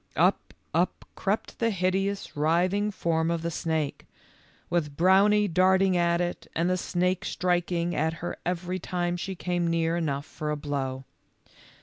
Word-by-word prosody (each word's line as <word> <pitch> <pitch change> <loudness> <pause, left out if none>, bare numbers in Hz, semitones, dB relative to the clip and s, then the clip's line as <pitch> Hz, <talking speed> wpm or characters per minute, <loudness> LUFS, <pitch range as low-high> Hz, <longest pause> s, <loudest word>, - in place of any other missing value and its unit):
Up, - - +2 0.2
up - - 0
crept - - -2
the 230 - +2
hideous 195 +1 -1
writhing 180 +7 +2
form 165 -4 0
of 170 -1 -1
the 170 - -1
snake, 160 -3 -2 0.6
with 150 -5 -1
Brownie 200 +4 +5
darting 185 +1 +3
at 170 -1 +2
it 175 0 -3
and 165 +2 +1
the 185 - +2
snake 180 0 0
striking 175 -1 0
at 160 +2 +1
her 165 +1 -5
every 180 +1 -2
time 175 0 -2
she 190 +2 -4
came 175 -1 -1
near 165 0 +1
enough 145 -4 -1
for 150 - -5
a 150 - -1
blow. 135 -2 -3
175 Hz, 150 wpm, -27 LUFS, 160-185 Hz, 0.6 s, Brownie